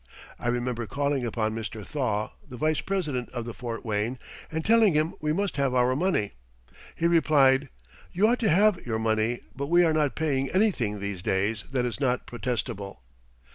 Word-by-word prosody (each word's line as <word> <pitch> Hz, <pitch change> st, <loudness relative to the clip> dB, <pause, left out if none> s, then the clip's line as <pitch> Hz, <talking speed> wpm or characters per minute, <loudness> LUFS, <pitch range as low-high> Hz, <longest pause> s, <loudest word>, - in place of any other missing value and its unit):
I -, -, -4 dB
remember 120 Hz, -1 st, -1 dB
calling 140 Hz, 0 st, -1 dB
upon 110 Hz, -1 st, -1 dB
Mr. 110 Hz, -2 st, -5 dB
Thaw, 110 Hz, -7 st, -1 dB, 0.2 s
the 125 Hz, -, -8 dB
vice 155 Hz, +3 st, +1 dB
president 150 Hz, -11 st, -2 dB
of 120 Hz, -2 st, -4 dB
the 120 Hz, -, -6 dB
Fort 120 Hz, -1 st, -6 dB
Wayne, 110 Hz, +3 st, -1 dB, 0.3 s
and 160 Hz, 0 st, -3 dB
telling 220 Hz, -6 st, +5 dB
him 155 Hz, +2 st, +1 dB
we 150 Hz, 0 st, 0 dB
must 195 Hz, 0 st, -1 dB
have 135 Hz, -2 st, +1 dB
our 125 Hz, +1 st, +3 dB
money. 155 Hz, -, 0 dB, 0.6 s
He 165 Hz, -, -2 dB
replied: 145 Hz, -5 st, +4 dB, 0.4 s
"You 195 Hz, +4 st, +3 dB
ought 245 Hz, +2 st, +2 dB
to 220 Hz, -, +2 dB
have 195 Hz, +2 st, +4 dB
your 115 Hz, -2 st, -2 dB
money, 110 Hz, +1 st, 0 dB
but 140 Hz, +1 st, -3 dB
we 175 Hz, +3 st, +5 dB
are 160 Hz, -2 st, +3 dB
not 150 Hz, -3 st, +1 dB
paying 140 Hz, -4 st, 0 dB
anything 155 Hz, -, +1 dB
these 100 Hz, -2 st, -4 dB
days 100 Hz, +2 st, 0 dB
that 125 Hz, -2 st, 0 dB
is 120 Hz, 0 st, -3 dB
not 125 Hz, -3 st, 0 dB
protestable." 115 Hz, -, -4 dB
130 Hz, 180 wpm, -27 LUFS, 115-155 Hz, 0.6 s, telling